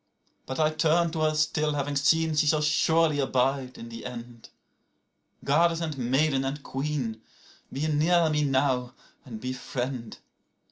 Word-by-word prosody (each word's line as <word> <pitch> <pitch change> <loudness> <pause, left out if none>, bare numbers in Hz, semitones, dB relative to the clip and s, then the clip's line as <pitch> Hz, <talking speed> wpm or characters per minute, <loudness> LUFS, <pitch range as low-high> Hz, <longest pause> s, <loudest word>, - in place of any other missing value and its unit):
91But 130 - -4
I 155 0 +3
turn 165 +1 +2
to 160 - -4
her 155 0 +2
still, 150 0 +1
having 145 0 -2
seen 160 +3 +2
she 150 0 +2
shall 150 0 +2
surely 155 0 +2
abide 130 -1 0
in 115 - -9
the 115 0 -7
end;92Goddess 125 +6 -4
and 160 -3 -3
maiden 135 +3 +1
and 140 +2 -4
queen, 135 -5 -3 0.5
be 145 +4 -2
near 160 +3 +3
me 150 0 +1
now 130 -2 0 0.3
and 115 -5 -8
befriend. 125 -1 -5
145 Hz, 140 wpm, -27 LUFS, 130-155 Hz, 0.5 s, I